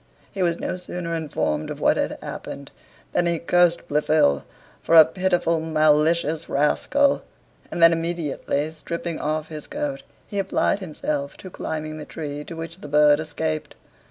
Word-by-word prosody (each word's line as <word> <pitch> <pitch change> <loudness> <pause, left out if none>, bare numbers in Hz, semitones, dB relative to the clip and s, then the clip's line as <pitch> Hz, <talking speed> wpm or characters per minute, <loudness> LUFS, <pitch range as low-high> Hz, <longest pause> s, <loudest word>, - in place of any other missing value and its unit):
He 195 - -4
was 170 -2 +2
no 185 - -3
sooner 180 -1 -5
informed 145 - -1
of - - -6
what - - +4
had - - -1
happened, - - -7 0.4
than 175 - +2
he 170 -1 +1
cursed 170 0 +2
Blifil 150 - +3 0.4
for 165 - +2
a 160 -1 +11
pitiful 175 -1 +1
malicious 155 0 +2
rascal; 275 - +2 0.5
and 170 - 0
then 165 0 +8
immediately 160 -3 -2
stripping 170 +1 -5
off 155 +1 -2
his 155 -1 -8
coat 290 -2 -3 0.2
he 205 - -4
applied 195 +1 +1
himself 150 -5 -3
to 185 - -10
climbing 155 -1 -4
the 150 - -7
tree 150 -2 -6
to 170 - -8
which 165 +2 -7
the - - -7
bird 150 0 +5
escaped. 145 - -3
160 Hz, 155 wpm, -23 LUFS, 150-175 Hz, 0.5 s, a